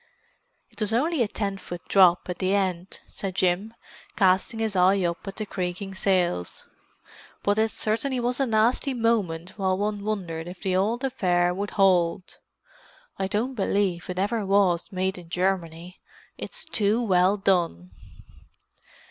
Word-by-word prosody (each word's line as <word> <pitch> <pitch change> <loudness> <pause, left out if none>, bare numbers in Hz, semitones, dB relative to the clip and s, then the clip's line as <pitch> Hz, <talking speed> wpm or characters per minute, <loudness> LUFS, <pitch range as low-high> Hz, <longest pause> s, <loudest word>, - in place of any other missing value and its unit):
"It 220 - -15
was 215 0 0
only 295 +5 +1
a 230 - +2
ten 200 -2 -3
foot 175 -2 -8
drop 180 -3 +5
at 180 -2 -5
the 190 +1 +1
end," 185 -2 -2
said 190 -2 -5
Jim, 190 +5 0 0.4
casting 190 +3 +2
his 220 -2 -1
eye 185 +2 +4
up 170 +3 -3
at 195 - -5
the 215 - -4
creaking 190 0 -4
sails. 180 - 0 0.8
"But 205 +1 +2
it 220 0 +3
certainly 230 +5 -1
was 245 +2 -1
a 270 - +1
nasty 235 +5 +2
moment 200 -6 -1
while 190 -1 +1
one 205 0 -2
wondered 175 -6 -3
if 180 0 -9
the 190 -2 0
old 220 +7 0
affair 180 -9 +1
would 200 +3 -3
hold. 185 -2 +2 0.8
I 190 - 0
don't 225 +7 -1
believe 195 -6 -1
it 180 - -4
ever 205 +3 0
was 195 -3 +2
made 190 0 -2
in 170 -2 -14
Germany—it's 180 - -4
too 210 +1 +1
well 190 -1 +3
done!" 170 - 0
195 Hz, 150 wpm, -25 LUFS, 180-215 Hz, 0.8 s, drop